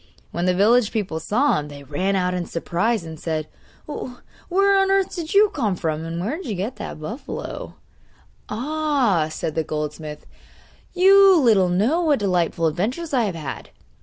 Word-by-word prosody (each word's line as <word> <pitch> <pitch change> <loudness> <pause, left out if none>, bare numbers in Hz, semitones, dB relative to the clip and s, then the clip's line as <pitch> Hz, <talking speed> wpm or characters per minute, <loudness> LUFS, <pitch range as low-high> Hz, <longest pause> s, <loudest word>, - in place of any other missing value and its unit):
When 175 +1 -1
the 180 - +2
village 220 +3 +4
people 195 -7 -2
saw 235 - +1
him, 150 - -6
they 145 -1 -10
ran 180 +8 -1
out 180 -1 0
in 180 -1 -3
surprise, 180 +5 -1
and 160 -2 -9
said: 155 -2 -3 0.4
'Where 375 +9 -1
on 390 0 +2
earth 390 -1 +2
do 340 -3 -3
you 420 0 +6
come 215 -9 -1
from, 160 -2 -2
and 165 +1 -4
where 225 - -2
did 370 - -8
you 215 - -2
get 205 +6 -4
that 205 -6 -7
buffalo?' 220 - -6 0.7
'Ah!' 255 - 0
said 155 0 -4
the 160 - 0
goldsmith, 150 0 -5 0.7
'you 385 0 +7
little 215 -9 +4
know 220 - +2
what 305 -4 +3
delightful 180 -4 0
adventures 235 - -2
I 245 -4 +3
have 190 -4 -3
had! 150 -5 -6
200 Hz, 170 wpm, -22 LUFS, -, 0.7 s, you